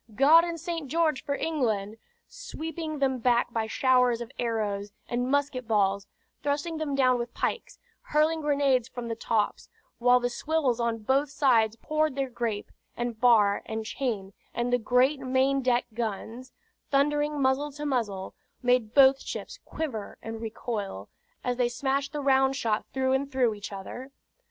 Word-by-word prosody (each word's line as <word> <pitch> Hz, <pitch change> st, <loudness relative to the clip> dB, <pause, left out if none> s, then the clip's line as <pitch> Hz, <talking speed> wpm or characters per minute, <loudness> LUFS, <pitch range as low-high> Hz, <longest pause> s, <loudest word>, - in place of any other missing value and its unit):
"God 305 Hz, +7 st, +7 dB
and 340 Hz, -1 st, -3 dB
St. 335 Hz, -3 st, -4 dB
George 310 Hz, -1 st, +1 dB
for 280 Hz, -, -1 dB
England!" 225 Hz, -10 st, -1 dB, 0.3 s
sweeping 325 Hz, -10 st, -6 dB
them 265 Hz, -2 st, +1 dB
back 240 Hz, 0 st, +2 dB
by 225 Hz, -1 st, -1 dB
showers 250 Hz, 0 st, +3 dB
of 235 Hz, -1 st, -7 dB
arrows 210 Hz, -4 st, -2 dB, 0.2 s
and 245 Hz, +1 st, -1 dB
musket 280 Hz, -3 st, 0 dB
balls, 200 Hz, -2 st, +1 dB, 0.3 s
thrusting 295 Hz, +3 st, -1 dB
them 295 Hz, -3 st, -2 dB
down 255 Hz, -2 st, +3 dB
with 235 Hz, 0 st, -5 dB
pikes, -, -, -3 dB, 0.2 s
hurling 310 Hz, +2 st, +1 dB
grenades 280 Hz, -5 st, +2 dB
from 245 Hz, -2 st, -7 dB
the 230 Hz, -, -2 dB
tops; 220 Hz, -2 st, -1 dB, 0.3 s
while 245 Hz, +1 st, +5 dB
the 245 Hz, -, 0 dB
swivels 280 Hz, -3 st, 0 dB
on 230 Hz, -2 st, -1 dB
both 270 Hz, +5 st, +2 dB
sides 235 Hz, -6 st, +3 dB
poured 310 Hz, +3 st, -1 dB
their 270 Hz, -2 st, -2 dB
grape, 230 Hz, -4 st, -3 dB, 0.3 s
and 240 Hz, -2 st, -3 dB
bar, 215 Hz, -5 st, +5 dB
and 220 Hz, 0 st, -4 dB
chain, 215 Hz, -5 st, -3 dB, 0.2 s
and 240 Hz, +1 st, -1 dB
the 245 Hz, -, +4 dB
great 250 Hz, +5 st, +2 dB
main 265 Hz, +1 st, +1 dB
deck 245 Hz, -1 st, +2 dB
guns, 230 Hz, +3 st, -5 dB, 0.4 s
thundering 295 Hz, +1 st, +1 dB
muzzle 275 Hz, +2 st, +1 dB
to 295 Hz, +1 st, -6 dB
muzzle, 220 Hz, -9 st, -2 dB, 0.3 s
made 245 Hz, -3 st, +2 dB
both 270 Hz, -1 st, +6 dB
ships -, -, -6 dB
quiver 240 Hz, -10 st, -5 dB
and 225 Hz, 0 st, -6 dB
recoil, 210 Hz, -, -5 dB, 0.3 s
as 245 Hz, -1 st, -1 dB
they 245 Hz, -1 st, +2 dB
smashed 270 Hz, +3 st, -1 dB
the 295 Hz, -, -3 dB
round 270 Hz, -1 st, +3 dB
shot 225 Hz, -5 st, -1 dB
through 260 Hz, 0 st, +1 dB
and 275 Hz, +1 st, -1 dB
through 250 Hz, -4 st, +2 dB
each 205 Hz, 0 st, -8 dB
other. 205 Hz, +7 st, -7 dB
255 Hz, 160 wpm, -27 LUFS, 230-280 Hz, 0.4 s, God